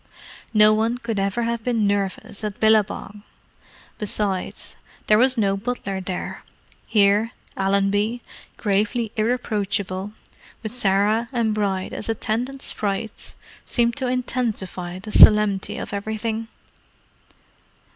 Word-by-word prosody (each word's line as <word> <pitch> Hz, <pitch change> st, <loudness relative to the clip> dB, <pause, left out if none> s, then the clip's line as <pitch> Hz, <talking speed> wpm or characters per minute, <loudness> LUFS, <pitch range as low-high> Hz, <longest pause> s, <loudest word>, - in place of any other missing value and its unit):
No 215 Hz, 0 st, +7 dB
one 225 Hz, +3 st, +1 dB
could 230 Hz, -4 st, -3 dB
ever 200 Hz, +4 st, 0 dB
have 230 Hz, -1 st, -2 dB
been 230 Hz, -3 st, +1 dB
nervous 200 Hz, 0 st, -2 dB
at 210 Hz, -1 st, -4 dB
Billabong. 210 Hz, -1 st, +1 dB, 0.8 s
Besides, 200 Hz, -3 st, -2 dB, 0.3 s
there 210 Hz, 0 st, +5 dB
was 255 Hz, +1 st, +4 dB
no 200 Hz, -3 st, +2 dB
butler 195 Hz, -3 st, -3 dB
there: 185 Hz, -1 st, -5 dB, 0.4 s
here, 210 Hz, +2 st, +3 dB, 0.2 s
Allenby, 200 Hz, +4 st, +1 dB, 0.3 s
gravely 210 Hz, +2 st, 0 dB
irreproachable, 205 Hz, -4 st, -1 dB, 0.5 s
with 220 Hz, -, -4 dB
Sarah 215 Hz, 0 st, +2 dB
and 230 Hz, -4 st, +1 dB
Bride 195 Hz, -3 st, -1 dB
as 215 Hz, -, -4 dB
attendant 240 Hz, +5 st, -2 dB
sprites, 210 Hz, +2 st, -3 dB, 0.3 s
seemed 235 Hz, -1 st, +1 dB
to 260 Hz, -3 st, 0 dB
intensify 220 Hz, -8 st, -2 dB
the 205 Hz, +3 st, -8 dB
solemnity 210 Hz, -1 st, +6 dB
of -, -, -6 dB
everything. 220 Hz, +2 st, -3 dB
215 Hz, 110 wpm, -23 LUFS, 200-230 Hz, 0.8 s, No